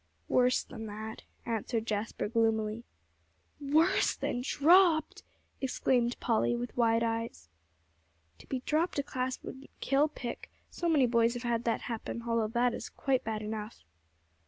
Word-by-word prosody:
"Worse 250 0 +3
than 225 -3 -8
that," 215 +1 -7 0.2
answered 225 0 -2
Jasper 215 -1 -2
gloomily. 225 0 0 0.7
"Worse 310 +6 +3
than 245 - -2
dropped!" 320 +3 +4 0.4
exclaimed 250 -2 +1
Polly 235 0 +1
with 240 0 -5
wide 230 -1 +3
eyes. 225 - -3 0.9
"To - - -15
be 260 -2 -3
dropped 315 +5 0
a 285 - +1
class 255 -1 -2
wouldn't 270 +1 -9
kill 280 +2 +3
Pick; 245 -5 -7 0.2
so 345 - -2
many 295 -5 +4
boys 235 0 +2
have 245 - -5
had 235 -1 -1
that 230 - 0
happen, 235 0 -5
although 230 0 0
it 245 - +2
is - - -6
quite 265 -2 0
bad 220 -1 -3
enough." 215 +1 -6
235 Hz, 145 wpm, -31 LUFS, 225-265 Hz, 0.9 s, dropped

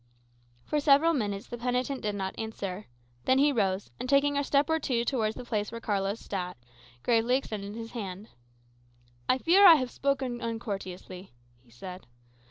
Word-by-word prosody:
For 300 - 0
several 295 +3 +5
minutes 205 -7 -2
the 240 - -7
penitent 250 +2 -1
did 210 -1 -2
not 190 -1 -3
answer. 205 -3 -5 0.4
Then 260 - +4
he 290 +2 +5
rose, 200 -6 0
and 250 +1 -4
taking 285 +1 +4
a 285 - +1
step 280 +1 +2
or 320 0 +1
two 240 -5 0
towards 220 -4 0
the 250 - -8
place 210 -3 -2
where 230 - -6
Carlos 200 -1 -1
sat, 180 -5 -4 0.5
gravely 235 +1 +3
extended 210 -6 -4
his 225 0 -7
hand. 200 -3 -6 1.0
"I 255 - +5
fear 350 +9 +5
I 335 - +11
have 255 -5 -1
spoken 265 -3 -1
uncourteously," 195 - -6 0.3
he 125 - -26
said. 180 +11 -10
230 Hz, 170 wpm, -29 LUFS, 200-270 Hz, 1.0 s, I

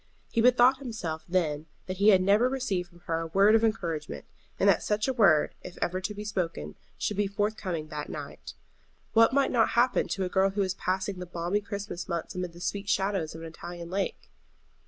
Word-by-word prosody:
He 230 - +2
bethought 250 +2 +5
himself 205 - -5
then 160 -4 0 0.2
that 185 0 -5
he 200 +3 +5
had 190 -3 +6
never 210 +6 +4
received 200 -10 -2
from 175 -1 -20
her 165 -1 -2
a 165 - -3
word 195 +6 +4
of 225 0 +4
encouragement, 170 -9 -2 0.3
and - - +3
that - - +5
such 210 +2 0
word, 195 - +4
if 180 - -10
ever 185 +2 -1
to 205 +2 -4
be 210 +1 -6
spoken, 165 - -3 0.2
should 210 - -2
be 205 -1 +2
forthcoming 195 -6 -2
that 150 -1 -5
night. - - -8 0.6
What 230 0 +6
might 275 0 +2
not 235 -3 +3
happen 245 +2 +3
to 195 - -2
a - - 0
girl 190 +1 +3
who 200 +1 -2
was 190 -1 0
passing 190 0 -2
the 180 - -6
balmy 175 +4 -1
Christmas 200 -3 -6
months 170 -2 -3
amid 180 -2 -4
the 175 - -12
sweet 200 +2 -3
shadows 195 -6 0
of 160 - -8
an 165 - -6
Italian 170 +1 -8
lake? 195 +1 -3
190 Hz, 205 wpm, -28 LUFS, 170-210 Hz, 0.6 s, had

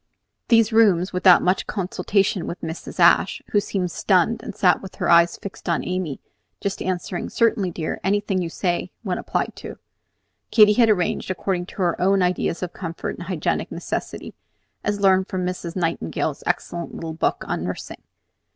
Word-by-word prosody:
These 225 -1 +4
rooms, 195 -5 +4
without 180 -1 +6
much 185 +1 +1
consultation 195 -1 0
with 170 - -5
Mrs. 160 +1 -7
Ashe, - - +4
who 205 - +4
seemed 190 -3 -2
stunned 210 +2 +2
and 210 - -7
sat 180 -6 +3
with 190 - -10
her - - -2
eyes 170 0 +5
fixed 200 -2 -8
on 170 - 0
Amy, 180 -6 -3 0.4
just 200 -1 -3
answering, 180 -1 -3
"Certainly, 220 -5 +1
dear, 165 -2 -4
anything 200 -1 0
you 170 - -3
say," 175 +1 -2
when 185 -4 -2
applied - - -2
to, - - -8 0.7
Katy 210 -2 +6
had 230 +1 +4
arranged 185 -4 0
according 185 -1 -2
to 190 - -4
her 170 -1 0
own 195 +1 +3
ideas 180 0 -1
of 180 - -5
comfort 170 -3 -5
and 175 - -7
hygienic 180 -5 -1
necessity, - - -5 0.5
as 205 -1 -1
learned 190 -1 +4
from 185 -2 -3
Miss 180 -2 -4
Nightingale's 165 - -2
excellent 170 -1 -2
little 165 -1 -5
book 160 - -1
on - - -2
nursing. - - -6
185 Hz, 170 wpm, -22 LUFS, 175-200 Hz, 0.7 s, without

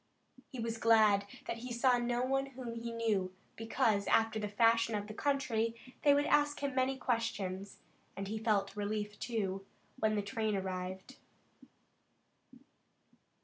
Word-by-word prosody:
He 260 - -7
was 230 0 -3
glad 215 -3 +5 0.2
that 230 - -3
he 250 +1 -7
saw 245 +1 +3
no 240 0 0
one 270 +1 0
whom 250 -3 -7
he 230 0 -5
knew, 210 -5 0 0.2
because, 225 -2 +1
after 225 -1 +3
the 210 - -2
fashion 230 +2 +3
of 205 -1 -2
the 215 - -8
country, 230 -4 0 0.3
they 290 - +5
would 290 +1 +2
ask 290 0 +2
him 280 -1 -1
many 260 +1 +1
questions, 205 -6 -2 0.4
and 195 0 -4
he 220 +2 -3
felt 205 -3 +1
relief, 210 0 -3
too, 195 -5 -2 0.4
when 215 -1 +2
the 205 - 0
train 215 +1 -1
arrived. 190 +5 -4
225 Hz, 145 wpm, -34 LUFS, 205-245 Hz, 0.4 s, glad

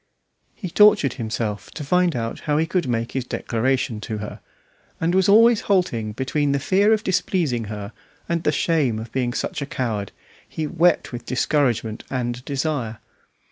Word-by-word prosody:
He 190 - -6
tortured 205 - +5
himself 110 -4 -3
to 155 - -5
find 180 +1 +2
out 115 -1 -3
how 150 - +3
he 160 - +2
could 170 -2 -1
make 115 -1 -1
his 130 - -2
declaration 120 -1 -1
to 110 0 -4
her, 105 0 -7 0.6
and 170 +2 +1
always 230 +2 +6
halting 125 - 0
between 140 +4 0
the 140 - +1
fear 195 +8 +3
of 220 -1 +2
displeasing 165 - 0
her 105 -1 -6 0.3
and 170 -1 0
the - - +2
shame 145 -7 +1
of 110 +1 -7
being 125 -2 0
such 130 - -3
a 140 - -3
coward, 110 -8 -3 0.4
he 160 - -3
wept 170 +2 +2
with 120 - -7
discouragement 125 -5 0
and 125 -1 -3
desire. 140 -5 -2
135 Hz, 165 wpm, -22 LUFS, 115-165 Hz, 0.6 s, always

